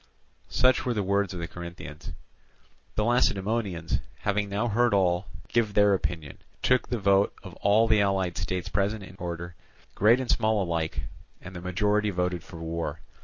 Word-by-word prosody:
Such 130 0 +3
were 125 -2 -1
the 105 - 0
words 100 0 +1
of 90 - -5
the 85 - -3
Corinthians. 85 -3 -8 0.8
The 105 - +1
Lacedaemonians, 100 - +1 0.2
having 105 0 0
now 105 +4 0
heard 120 0 +3
all, 90 -1 +2 0.2
give 110 -4 +1
their 105 -1 +5
opinion, 85 -6 -3 0.2
took 125 0 +2
the 120 - 0
vote 100 -1 +3
of - - -9
all 105 +3 +4
the 110 -2 +4
allied 95 -3 +1
states 90 +1 -3
present 100 +2 0
in 95 - -11
order, 85 -1 -5 0.4
great 115 +5 +5
and 130 - -3
small 110 -2 +2
alike; 85 -2 -2 0.4
and 90 0 -10
the 90 - -6
majority 105 +4 +1
voted 90 -2 -1
for 85 - -11
war. 80 -2 -4
100 Hz, 170 wpm, -27 LUFS, 90-105 Hz, 0.8 s, their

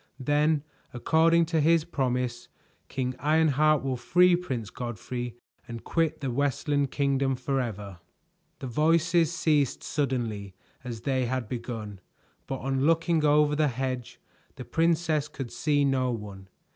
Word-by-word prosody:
Then, 150 +2 +2 0.3
according 165 +6 +3
to 165 -1 0
his 165 +1 +3
promise, 125 -6 -2 0.4
King 130 -1 -2
Ironheart 155 0 +3
will 130 -2 -1
free 180 +8 +4
Prince 130 - -4
Godfrey 120 +1 -5 0.3
and 115 -1 -7
quit 165 -4 0
the 135 -3 -2
Westland 140 +2 0
Kingdom 135 -1 0
forever." 115 -8 -3 0.6
The - - -7
voices 165 +5 +2
ceased 150 -6 +1
suddenly 115 -9 -2 0.3
as 120 -3 -6
they 130 -2 0
had 130 -2 -2
begun, 115 -5 -6 0.5
but 135 - -3
on 135 0 -1
looking 165 +1 +2
over 150 0 +4
the 150 0 +2
hedge, 130 -1 -4 0.4
the 130 -2 -8
princess 165 -2 +1
could 135 -4 -7
see 145 -2 +1
no 130 -2 +1
one. 100 -5 -6
135 Hz, 130 wpm, -27 LUFS, 125-155 Hz, 0.6 s, free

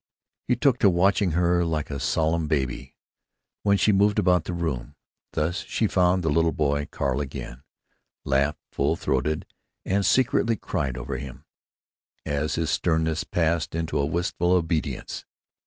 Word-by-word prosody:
He 125 - +3
took 125 0 +2
to 100 - +5
watching 95 0 +2
her 85 +1 +2
like 80 -3 -2
a 70 - -3
solemn 80 +4 0
baby, 65 -5 -2 0.7
when 100 -1 +3
she 105 - +3
moved 100 +1 +3
about 90 -2 +3
the - - -4
room; 75 -5 -3 0.4
thus 80 +4 0
she 115 - -1
found 90 -2 +2
the 80 - +1
little 80 +2 +3
boy 70 -1 0
Carl 70 0 -1
again; 65 -2 -7 0.6
laughed 70 +2 +1
full 70 +4 +1
throated 75 0 -1 0.4
and 100 +1 +1
secretly 115 0 +2
cried 70 - -3
over 65 +1 -4
him, 65 -2 -9 0.8
as 75 +2 -1
his 80 -2 -1
sternness 80 -2 +1
passed 80 -1 0
into 80 -2 -1
a 70 - +2
wistful 85 +2 0
obedience. 80 -3 -1
80 Hz, 150 wpm, -25 LUFS, 75-90 Hz, 0.8 s, to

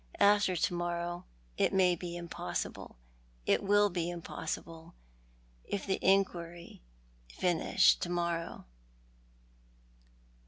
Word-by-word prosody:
After 200 -2 +4
to 175 - +1
morrow 175 0 -3 0.3
it - - +2
may 180 -2 +4
be 175 0 -6
impossible; 170 -1 -5 0.5
it - - +3
will 205 0 +4
be 175 -1 -1
impossible 165 - -6 0.7
if 200 - -4
the 190 - 0
inquiry 175 -3 0 0.6
linish 180 +1 +3
to 175 - -3
morrow." 170 -1 -2
175 Hz, 95 wpm, -32 LUFS, 170-190 Hz, 0.7 s, After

